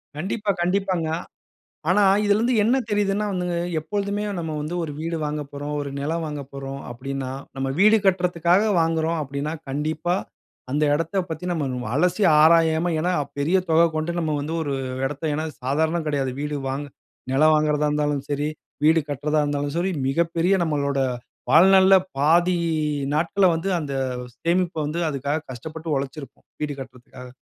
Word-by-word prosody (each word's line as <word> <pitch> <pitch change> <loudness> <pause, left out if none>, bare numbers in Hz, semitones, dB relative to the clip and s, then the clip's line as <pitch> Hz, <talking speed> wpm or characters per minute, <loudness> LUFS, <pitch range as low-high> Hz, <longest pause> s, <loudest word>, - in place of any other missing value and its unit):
கண்டிப்பா, 200 +6 -1
கண்டிப்பாங்க. 180 -2 0 0.8
ஆனா, 195 +3 +4 0.2
இதிலேருந்து 215 +4 +2
என்ன 235 +5 +3
தெரியுதுன்னா? 205 0 +1
வந்துங்க, 180 -2 -2 0.2
எப்போழுதுமே 200 +5 -2 0.2
நம்ம 160 -2 -3
வந்து 155 +4 -4
ஒரு 155 - -4
வீடு 165 +1 -2
வாங்க 150 0 -2
போறோம், 145 +1 -5
ஒரு 140 - -4
நிலம் 160 +4 -2
வாங்க 150 -2 -4
போறோம், 135 0 -6
அப்படீன்னா 130 +1 -5 0.2
நம்ம 135 0 -2
வீடு 215 +3 +6
கட்டுறதுக்காக 180 0 +3 0.2
வாங்குறோம், 165 0 0
அப்படீன்னா 140 +2 -4 0.2
கண்டிப்பா 155 +5 -1 0.6
அந்த 150 +2 +1
இடத்த 165 +5 -1
பத்தி, 160 +2 -5
நம்ம 130 -8 -2
அலசி 180 +6 +2 0.2
ஆராயாம, 165 +1 +4
ஏன்னா 175 +3 +1 0.3
பெரிய 160 +7 +2
தொகை 165 +1 +5
கொண்டு, 155 +2 -1
நம்ம 160 -2 -1
வந்து 150 +3 -4
ஒரு 145 -2 -2 0.3
இடத்த 145 +3 -5
ஏன்னா 155 +2 -2 0.2
சாதாரணம் 160 +5 0
கிடையாது. 140 -3 0
வீடு 150 0 -2
வாங்க 140 +2 -3 0.5
நிலம் 155 +4 +5
வாங்குறதா 150 -1 +2
இருந்தாலும் 150 -1 0
சரி, 145 +1 -1 0.4
வீடு 160 +2 +5
கட்டுறதா 150 +2 0
இருந்தாலும் 145 0 -2
சரி, 180 +3 +1 0.2
மிகப்பெரிய 170 +5 +1
நம்மளோட 140 -3 0 0.5
வாழ்நாள்ல 190 +4 +7 0.2
பாதி 170 +5 +4 0.6
நாட்கள்ல 175 +5 +2
வந்து, 165 +4 -2
அந்த 145 -3 -4 0.4
சேமிப்ப 175 +2 0
வந்து 155 +3 -3
அதுக்காக 145 +2 -2
கஷ்டப்பட்டு 160 +6 -7
உழைச்சுருப்போம். 135 0 -7 0.2
வீடு 150 -1 -1
கட்டுறதுக்காக. 125 -1 -11
155 Hz, 145 wpm, -23 LUFS, 145-175 Hz, 0.8 s, வாழ்நாள்ல